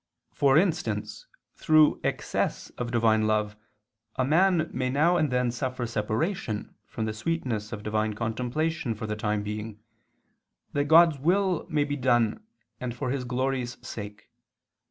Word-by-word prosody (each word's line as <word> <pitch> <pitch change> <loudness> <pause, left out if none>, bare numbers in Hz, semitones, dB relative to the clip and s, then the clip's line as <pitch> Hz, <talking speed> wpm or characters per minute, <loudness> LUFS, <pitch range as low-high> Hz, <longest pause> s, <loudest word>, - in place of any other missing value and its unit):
For 140 0 +4
instance 180 - -1 0.3
through 155 -1 +4
excess - - -2
of 120 -1 -5
Divine 110 -2 +3
love 105 -1 0 0.6
a 130 - +1
man 165 +2 +3
may 130 0 -1
now 155 +7 +3
and 155 -4 +2
then 125 -1 +1
suffer 125 +1 -3
separation 110 - -2
from 110 - -4
the 110 - -2
sweetness 115 -4 -3
of 105 -3 -6
Divine 110 0 -1
contemplation 125 +5 -2
for 110 - -6
the 105 0 -3
time 105 -1 -1
being, 105 0 -5 0.9
that 145 0 +1
God's 160 -1 +6
will 180 +3 +1
may 150 -3 +2
be 145 0 -3
done 120 - +2 0.4
and 120 -2 -4
for 125 0 -2
His 130 -2 -2
glory's 125 0 -2
sake. 105 -1 -8
125 Hz, 145 wpm, -27 LUFS, 110-155 Hz, 0.9 s, God's